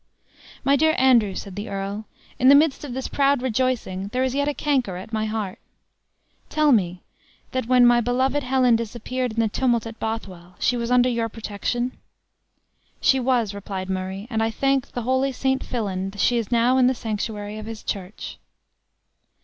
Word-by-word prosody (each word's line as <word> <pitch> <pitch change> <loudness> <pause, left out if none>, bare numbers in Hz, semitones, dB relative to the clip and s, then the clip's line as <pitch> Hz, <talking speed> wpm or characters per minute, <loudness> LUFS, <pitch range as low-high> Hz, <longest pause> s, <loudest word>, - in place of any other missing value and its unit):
"My 280 +1 +4
dear 315 +2 +3
Andrew," 235 -7 +4
said 195 -2 -7
the 205 +2 -5
earl, 200 +2 -4 0.3
"in 255 - +6
the 280 - +9
midst 295 0 +3
of 275 -4 -6
this 265 - -3
proud 280 -2 +2
rejoicing 235 -6 -1
there 250 +5 -1
is 260 -1 0
yet 285 +1 0
a 295 - +1
canker 255 -11 0
at 195 +5 -10
my 220 0 0
heart. 215 -3 -3 0.9
Tell 305 -1 +3
me, 180 -6 +1 0.5
that 255 -3 -2
when 250 -1 +6
my 240 0 +5
beloved 260 +4 +1
Helen 255 -2 +3
disappeared 235 +2 -3
in 230 - -3
the 225 - +3
tumult 235 +1 +1
at 225 0 -8
Bothwell, 185 -6 -5
she 250 - +1
was 235 -1 -2
under 250 0 +4
your 230 -2 0
protection?" 225 +3 -3 1.0
"She 265 - +3
was," 240 -5 +1
replied 190 -2 -5
Murray; 190 +2 -4
"and 220 -1 0
I 225 - +2
thank 270 +3 0
the 245 - -4
holy 260 +3 +1
St. 265 +1 0
Fillan, 195 -5 -3
she 240 +4 +2
is 230 +1 -5
now 240 +2 +3
in 250 - +5
the 260 - +2
sanctuary 215 -2 -4
of 215 - -8
his 225 -1 -7
church." 195 0 -6
235 Hz, 180 wpm, -23 LUFS, 210-260 Hz, 1.0 s, the